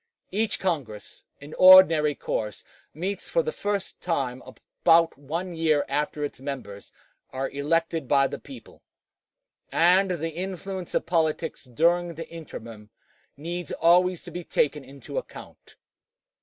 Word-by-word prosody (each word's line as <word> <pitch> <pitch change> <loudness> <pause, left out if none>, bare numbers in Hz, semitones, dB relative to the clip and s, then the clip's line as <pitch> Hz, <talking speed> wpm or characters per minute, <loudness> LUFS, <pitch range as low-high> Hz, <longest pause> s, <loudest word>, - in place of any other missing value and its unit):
Each 215 +2 0
Congress, 140 - -4
in 145 +2 -11
ordinary 165 -5 +8
course, 105 -5 -4 0.3
meets 185 +5 -5
for - - +2
the 470 - -2
first 205 - -4
time 135 -7 -2
about 165 0 +1
one 165 +6 -5
year 160 -3 +1
after 150 +1 -2
its 145 - -5
members 135 -8 -7 0.4
are 135 +1 -4
elected 165 +1 -1
by 140 +1 +4
the - - -4
people, 270 - -13 0.9
and 185 +3 +4
the 165 -2 -2
influence 185 +1 -5
of - - 0
politics 160 -2 -1
during 170 +6 +1
the 165 - -7
interim 115 -10 -10 0.5
needs 170 +2 -5
always 180 +1 +3
to - - -10
be 175 - -6
taken 150 -2 0
into 140 - -6
account. - - -13
165 Hz, 130 wpm, -25 LUFS, 140-180 Hz, 0.9 s, ordinary